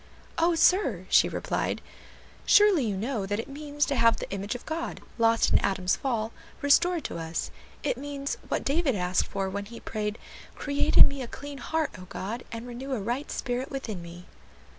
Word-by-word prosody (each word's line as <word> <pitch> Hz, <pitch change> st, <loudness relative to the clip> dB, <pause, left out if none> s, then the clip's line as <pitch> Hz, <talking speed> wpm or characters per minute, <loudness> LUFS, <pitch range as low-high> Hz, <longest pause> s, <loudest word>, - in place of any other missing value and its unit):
"O 335 Hz, +1 st, +4 dB
sir!" 315 Hz, -, +3 dB
she -, -, +5 dB
replied, -, -, -2 dB, 0.6 s
"surely 415 Hz, -8 st, +6 dB
you 205 Hz, -3 st, -1 dB
know 215 Hz, -1 st, -2 dB
that 205 Hz, +2 st, -1 dB
it -, -, -4 dB
means 295 Hz, +1 st, -2 dB
to 280 Hz, -, -1 dB
have 230 Hz, -2 st, +4 dB
the -, -, -5 dB
image 200 Hz, +4 st, -3 dB
of 245 Hz, -, -8 dB
God, 320 Hz, +1 st, -4 dB, 0.2 s
lost 230 Hz, 0 st, +4 dB
in -, -, +6 dB
Adam's 185 Hz, -2 st, +1 dB
fall, 230 Hz, -4 st, -1 dB, 0.3 s
restored 320 Hz, +3 st, +3 dB
to -, -, -4 dB
us; 165 Hz, 0 st, -3 dB, 0.3 s
it -, -, 0 dB
means 280 Hz, -1 st, -4 dB
what -, -, -1 dB
David 285 Hz, -3 st, +2 dB
asked 180 Hz, -1 st, +1 dB
for 195 Hz, -1 st, -2 dB
when 200 Hz, +1 st, -4 dB
he 230 Hz, +3 st, -10 dB
prayed, 210 Hz, 0 st, -3 dB, 0.4 s
'Create 285 Hz, -1 st, 0 dB
in -, -, +11 dB
me 280 Hz, -1 st, -5 dB
a 250 Hz, -, -4 dB
clean 285 Hz, +3 st, -8 dB
heart, 320 Hz, +4 st, -1 dB
O 185 Hz, -, -9 dB
God, 215 Hz, +7 st, -5 dB
and 230 Hz, +1 st, -6 dB
renew 250 Hz, +3 st, -5 dB
a 250 Hz, -, -1 dB
right 240 Hz, +8 st, -2 dB
spirit 250 Hz, 0 st, -2 dB
within 225 Hz, -9 st, -5 dB
me.'" 170 Hz, +1 st, -10 dB
245 Hz, 190 wpm, -28 LUFS, 200-285 Hz, 0.6 s, in